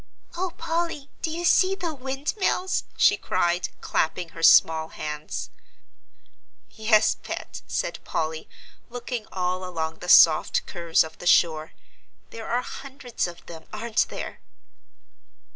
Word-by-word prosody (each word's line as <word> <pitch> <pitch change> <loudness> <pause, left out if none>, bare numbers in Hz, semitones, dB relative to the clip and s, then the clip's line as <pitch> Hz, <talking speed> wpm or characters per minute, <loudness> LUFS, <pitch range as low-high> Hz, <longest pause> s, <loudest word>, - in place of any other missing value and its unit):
"Oh, 360 0 -2
Polly, 330 -4 -3
do - - -1
you 340 +2 -3
see 375 +2 +4
the 345 -4 -3
windmills?" 305 +8 -1
she - - +5
cried, 175 +1 0
clapping 165 +2 -1
her 165 - -10
small 160 -1 +6
hands. 150 -1 -6 1.2
"Yes, 220 -1 +3
Pet," - - -7
said - - -2
Polly, 160 0 -3 0.4
looking 245 -2 -5
all 185 0 -2
along 160 -3 -4
the 180 - -7
soft 160 -2 +6
curves 170 -2 +1
of 160 0 -11
the 175 - -5
shore, 160 -3 +3 0.6
"there 225 -1 -8
are 245 +1 0
hundreds 265 -7 -5
of 175 0 -11
them, 165 -1 -11
aren't 220 +1 0
there?" - - -6
215 Hz, 125 wpm, -25 LUFS, -, 1.2 s, small